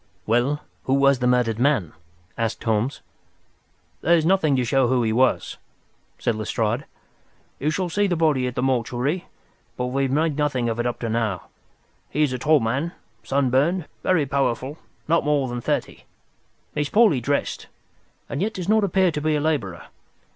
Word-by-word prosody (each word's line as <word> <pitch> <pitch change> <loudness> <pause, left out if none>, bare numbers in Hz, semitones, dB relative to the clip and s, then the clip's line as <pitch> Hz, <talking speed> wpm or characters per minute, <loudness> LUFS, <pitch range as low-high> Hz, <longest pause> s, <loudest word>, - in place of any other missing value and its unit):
"Well, 120 +6 +1 0.2
who 130 - +2
was 140 -1 +4
the 125 - +1
murdered 120 -3 +2
man?" 125 - +1 0.4
asked 115 -1 -2
Holmes. 115 +4 0 1.0
"There's 165 0 +3
nothing 165 -6 +3
to 125 -1 +1
show 130 +1 +2
who 125 -1 +2
he 110 -1 +1
was," 130 +3 +1 0.6
said 120 - 0
Lestrade. 110 +4 -1 0.7
"You 150 - 0
shall 180 +4 -1
see 205 +4 +1
the 180 - 0
body 150 -6 +2
at 125 - -5
the 125 - -1
mortuary, 130 +6 -1 0.5
but 125 - -1
we 130 +2 -1
have 135 -1 0
made 155 +1 +1
nothing 135 -5 0
of 115 +1 -3
it 120 - +1
up 120 -1 -2
to 115 - -2
now. 110 -5 -2 0.6
He 150 - +1
is 140 -4 +1
a 125 - -3
tall 150 +3 +4
man, 130 +9 -1 0.3
sunburned, 140 +6 +1 0.2
very 170 -6 +2
powerful, 140 +1 -1 0.3
not 165 +1 +3
more 145 -2 +1
than 120 0 -4
thirty. - - -2 0.7
He 150 - -1
is 145 - -2
poorly 210 - +4
dressed, 140 +4 -2 0.6
and 140 - -4
yet 220 +3 -1
does 180 -2 -4
not 215 +1 +3
appear 190 -1 +2
to 150 -1 -3
be 155 0 +1
a - - +1
labourer. 145 - -2
135 Hz, 175 wpm, -23 LUFS, 120-155 Hz, 1.0 s, was